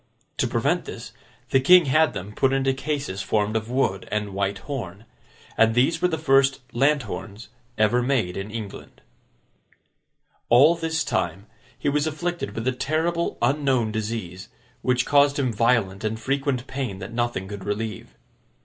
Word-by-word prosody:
To - - +1
prevent - - 0
this, - - -8 0.4
the 135 - +5
King 180 +5 +7
had 155 +4 +3
them 100 +3 -6
put 135 +3 +2
into 135 0 +2
cases 135 -7 -3
formed 105 +1 0
of 110 +1 -2
wood 120 -7 0
and 105 -1 -2
white 100 0 -1
horn. 110 -7 -6 0.5
And 115 0 +4
these 130 +7 +2
were 180 - +4
the 160 -3 -2
first 135 -3 +3
lanthorns 120 -5 -1 0.3
ever 110 +3 +3
made 120 -9 0
in 95 +2 -5
England. 110 -2 -8 1.5
All 140 +7 +7
this 165 -1 -1
time, 95 +1 -2 0.3
he - - -4
was 145 +2 +1
afflicted 170 -7 -3
with 115 +2 -3
a - - +3
terrible 160 +6 -1
unknown 135 -6 +1
disease, 105 -4 -5 0.3
which 125 -1 +1
caused 145 0 +4
him 130 -4 0
violent 110 -3 +1
and 110 +1 -2
frequent 135 +1 -1
pain 130 -8 -4
that 95 +4 -8
nothing 120 -5 -2
could 100 -1 -7
relieve. 105 0 -4
120 Hz, 155 wpm, -24 LUFS, 105-140 Hz, 1.5 s, King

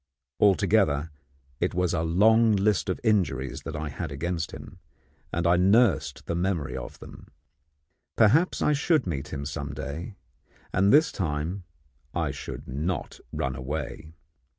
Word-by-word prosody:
Altogether, 95 -7 +3 0.5
it 90 0 -1
was 90 -1 +1
a - - +1
long 110 +7 +4
list 100 0 +1
of 95 - -1
injuries 85 - 0
that 80 - -6
I 75 0 -3
had 70 - -5
against 80 +3 -2
him, - - -11 0.5
and 85 +1 -1
I 85 +1 +4
nursed 90 - +3
the - - -2
memory 85 -4 -1
of - - -7
them. - - -12 0.9
Perhaps 145 - +4
I 150 - +3
should 150 +2 +2
meet 75 -5 -3
him 70 -1 -5
some 70 0 -5
day, 80 - -6 0.6
and 100 +2 +4
this 155 +2 +5
time 85 +2 -3 0.5
I - - 0
should - - -8
not 80 +7 -3
run 65 0 -2
away. 75 +3 -5
85 Hz, 145 wpm, -27 LUFS, 75-100 Hz, 0.9 s, this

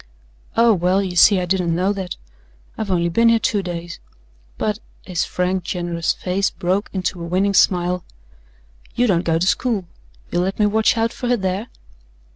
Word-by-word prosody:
"Oh, 230 0 +6
well, 185 +1 +1
you 180 -2 -4
see 195 +2 +6
I 180 - -1
didn't 175 -2 0
know 185 +4 +1
that. 190 -3 -5 0.6
I've 215 - -4
only 170 -2 +1
been 230 +7 +3
here 230 - +5
two 210 -2 0
days. 175 -1 -6 0.6
But" 210 0 -1 0.3
his 180 -2 -1
frank, 180 0 -1
generous 170 -1 -1
face 190 +2 -1
broke 185 +4 -1
into 185 -2 -3
a 170 - -5
winning 190 +3 +1
smile 180 -1 +2 0.9
"you 245 - +2
don't 185 -7 +2
go 165 -2 +1
to 170 - 0
school. 210 -1 0 0.5
You'll 175 - +1
let 190 +2 -2
me 210 - +3
watch 220 +2 +2
out 225 +1 0
for 250 - -4
her 245 0 +2
there?" 190 +3 -2
185 Hz, 180 wpm, -20 LUFS, 175-205 Hz, 0.9 s, Oh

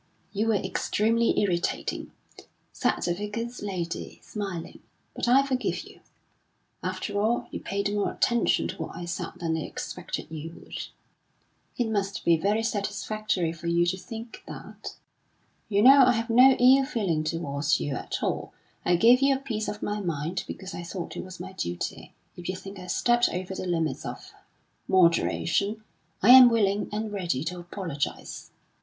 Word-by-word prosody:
"You 215 +2 0
were 225 - +3
extremely 220 +4 +1
irritating," 180 -4 -1 0.6
said - - +1
the 175 - +1
Vicar's 230 +5 -5
lady, 180 -4 -4
smiling, 195 -6 -5 0.4
"but - - -2
I 265 +3 +5
forgive 260 -2 -1
you. - - -15 0.8
After 205 -1 -2
all, 230 +3 +1
you - - -4
paid 200 +1 -2
more 205 -1 0
attention 235 0 +2
to - - -5
what - - -5
I 175 - -6
said 170 - -4
than 165 -2 -2
I - - -1
expected 155 - -6
you 160 +1 -6
would." - - -7 0.9
"It 240 - +1
must 200 -2 -2
be 170 - +6
very 205 +7 +1
satisfactory 210 -4 -1
for 170 +1 -8
you 170 0 +3
to 175 +2 +1
think 225 +2 -8
that." - - -9 0.7
"You 205 0 +3
know 270 +2 +9
I 250 0 +5
have 230 0 -2
no 255 +3 +8
ill 260 +2 +6
feeling 205 - -1
towards 155 -2 0
you 145 - -2
at - - -4
all. - - -2 0.3
I 175 - +3
gave 235 +8 +6
you 275 0 +4
a - - -3
piece 225 -6 -3
of 210 - -5
my 210 0 -1
mind 170 -1 -3
because 190 -1 -7
I - - -5
thought 175 +1 -6
it - - -4
was 185 -1 -10
my 185 +2 -7
duty. 85 - -4 0.2
If 175 0 -7
you 185 - -1
think 195 +1 -9
I 180 - -9
stepped 240 +4 +3
over 185 +1 -4
the 185 - -4
limits 165 -5 -1
of - - -8 0.5
moderation, 190 +3 +2 0.4
I 230 - +8
am 255 -1 +11
willing 205 -3 +1
and 215 +1 -3
ready 175 -9 -1
to 175 +2 -4
apologise." 175 -4 -5
200 Hz, 170 wpm, -27 LUFS, 175-225 Hz, 0.9 s, am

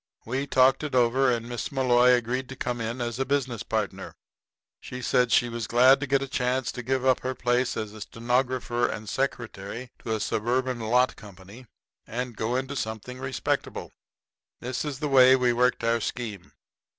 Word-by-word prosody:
We 130 +4 -2
talked 130 +2 +4
it 150 -3 -3
over, 125 +2 +3
and 115 -1 -2
Miss 120 -1 -4
Malloy 125 -2 +4
agreed 125 +2 -1
to 130 - -7
come 120 -2 -3
in 115 +3 -3
as 120 0 -3
a - - +2
business 130 -3 -1
partner. 110 -4 -3 0.6
She 125 - -8
said 125 0 +2
she 120 - +4
was 115 -2 -4
glad 130 +3 +6
to 145 - -3
get 135 0 +2
a - - -5
chance 130 -1 -1
to 125 - -6
give 130 +1 -1
up 130 -1 +4
her 130 0 -3
place 125 +1 0
as 110 -1 -4
stenographer 120 +1 0
and 105 0 -6
secretary 120 -2 -4
to 110 - -2
a - - -3
suburban 125 +4 -1
lot 125 +3 +2
company, 105 +3 -13 0.4
and 120 0 -4
go 110 +4 -2
into 130 +2 -2
something 110 +1 -5
respectable. 130 -1 -3 0.7
This 125 0 -3
is 145 -3 -4
the 150 +2 -2
way 130 -2 +7
we 125 -2 +2
worked 125 0 +1
our 115 0 +1
scheme. 105 -6 -5
125 Hz, 180 wpm, -26 LUFS, 115-130 Hz, 0.7 s, way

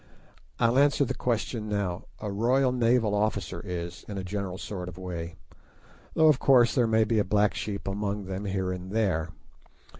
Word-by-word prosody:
I'll 115 +3 +3
answer 145 0 +4
the - - -2
question 115 -2 -2
now: 100 -4 -2
A 105 -2 -4
Royal 125 +6 +2
Naval 120 -3 +2
officer 100 -4 -1
is, 85 -3 -5
in 100 - -6
a 95 - -3
general 95 -1 -4
sort 90 -3 -5
of 90 - -11
way, 85 -3 -6 0.8
though 160 - +5
of 150 -4 +5
course 125 -4 +5
there 120 -3 +3
may 110 0 +3
be 110 0 +1
a - - +3
black 105 +2 +2
sheep 100 -2 -4
among 100 0 -2
them 95 +2 -5
here 95 -2 -1
and 90 0 -6
there. 95 -8 +1
105 Hz, 180 wpm, -27 LUFS, 95-115 Hz, 0.8 s, though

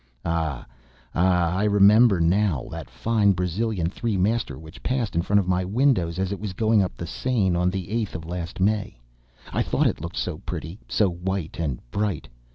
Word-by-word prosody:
Ah! 80 -6 -1 0.5
Ah! 90 -1 +2
I 100 - +1
remember 105 0 +6
now 85 -3 +2
that - - -7
fine 100 - +2
Brazilian 90 +1 -1
three 105 +3 -2
master 100 - 0
which 80 +2 -12
passed 125 -6 -1
in 85 - +3
front 100 +3 +3
of 95 - -1
my 90 0 +1
windows 95 -5 +1
as 95 0 -1
it 100 - -3
was 105 -3 -4
going 110 +1 +3
up 95 - -2
the 85 - -5
Seine, 100 -1 0
on 90 +1 +2
the 95 -1 -3
8th 110 -1 -2
of 80 0 -6
last 85 0 -5
May! 100 - 0 0.6
I - - +1
thought - - +1
it - - 0
looked 85 +2 -6
so 85 -4 -2
pretty, 85 0 -6
so 105 - +3
white 90 -1 -3
and 70 -7 -2
bright! 105 -1 -2
95 Hz, 190 wpm, -24 LUFS, 85-105 Hz, 0.6 s, remember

